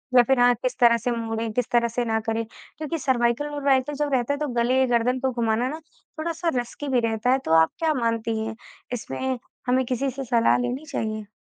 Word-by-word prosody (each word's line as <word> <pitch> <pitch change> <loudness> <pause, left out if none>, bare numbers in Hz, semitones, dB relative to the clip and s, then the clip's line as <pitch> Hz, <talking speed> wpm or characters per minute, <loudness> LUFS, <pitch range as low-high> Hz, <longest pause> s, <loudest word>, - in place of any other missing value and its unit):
या 245 - +9
फिर 265 -1 +3
हाथ 245 0 +5
किस 255 0 -1
तरह 235 -1 +6
से 245 +1 -2
मोड़ें, 225 -1 -2
किस 250 0 0
तरह 235 -1 +3
से 240 +1 -2
ना 220 -1 +1
करें? 225 0 0 0.3
क्योंकि 315 +1 -3
सर्वाइकल-वर्वाइकल 270 +2 +1
जब 290 0 -2
रहता 255 +2 +1
है - - -2
तो 300 - -1
गले-गर्दन 250 0 +2
को 265 0 0
घुमाना 235 0 0
ना, 310 - -5 0.4
थोड़ा-सा 335 +1 -1
रस्की 245 +4 -6
भी 255 -2 +3
रहता 230 +1 0
है। 265 - +4
तो - - -2
आप 160 - +2
क्या 320 -2 +2
मानती 230 -3 -1
हैं, 220 0 -5 0.4
इसमें 245 - -3 0.3
हमें 255 +1 +2
किसी 260 +2 -1
से 270 +1 -5
सलाह 235 -2 +3
लेनी 245 +5 -3
चाहिए? 215 -6 -4
245 Hz, 205 wpm, -24 LUFS, 230-270 Hz, 0.4 s, या